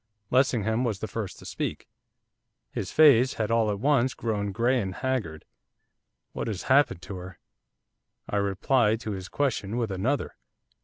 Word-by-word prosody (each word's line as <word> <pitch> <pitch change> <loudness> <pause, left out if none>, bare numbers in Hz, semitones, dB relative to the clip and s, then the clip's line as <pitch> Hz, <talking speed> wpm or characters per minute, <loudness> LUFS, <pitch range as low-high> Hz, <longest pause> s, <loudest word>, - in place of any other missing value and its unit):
Lessingham 120 -3 +2
was 115 -5 -1
the 110 - -5
first 105 -2 -5
to - - -13
speak, - - -4 0.8
his 95 - -4
face 130 -5 +6
had 110 0 -1
all 115 -2 +3
at 100 -1 -2
once 130 0 +2
grown 105 -3 -2
grey 120 +5 +1
and 95 -2 -4
haggard. 110 - -3 0.9
'What - - -4
has 105 -4 -3
happened 130 -9 +3
to 100 - -6
her?' 90 0 -9 0.9
I 105 - -1
replied 105 +3 +2
to 110 - -4
his 95 -2 -6
question 120 -6 -1
with 115 -4 -1
another. 115 +10 -1
110 Hz, 155 wpm, -27 LUFS, 100-130 Hz, 0.9 s, face